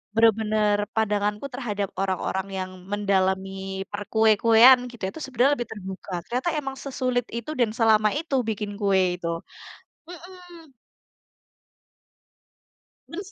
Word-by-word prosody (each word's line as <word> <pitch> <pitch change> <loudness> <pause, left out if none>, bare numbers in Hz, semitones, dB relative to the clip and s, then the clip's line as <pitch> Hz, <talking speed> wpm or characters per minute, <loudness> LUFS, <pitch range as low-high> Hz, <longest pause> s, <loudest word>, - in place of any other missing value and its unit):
bener-bener 215 -2 +3 0.2
pandanganku 210 +2 0
terhadap 210 -6 -3
orang-orang 190 0 -1
yang 185 0 -4 0.2
mendalami 195 -1 -1
perkue-kuean 220 +4 +5
gitu, 230 -5 -14
itu 320 - -10
sebenarnya 265 +2 +2
lebih 240 -2 -4
terbuka. 190 -2 -8 0.2
Ternyata 255 +8 -1
emang 270 -2 -5
sesulit 255 -3 -2
itu 235 +6 -4
dan 220 -3 +2
selama 215 -3 +4
itu 295 -1 -2
bikin 210 -2 -3
kue 190 -3 +2
itu, 170 -1 -3 0.7
mhm. 355 -3 -13 2.4
Bers 385 +4 -8
220 Hz, 110 wpm, -25 LUFS, 195-255 Hz, 2.4 s, perkue-kuean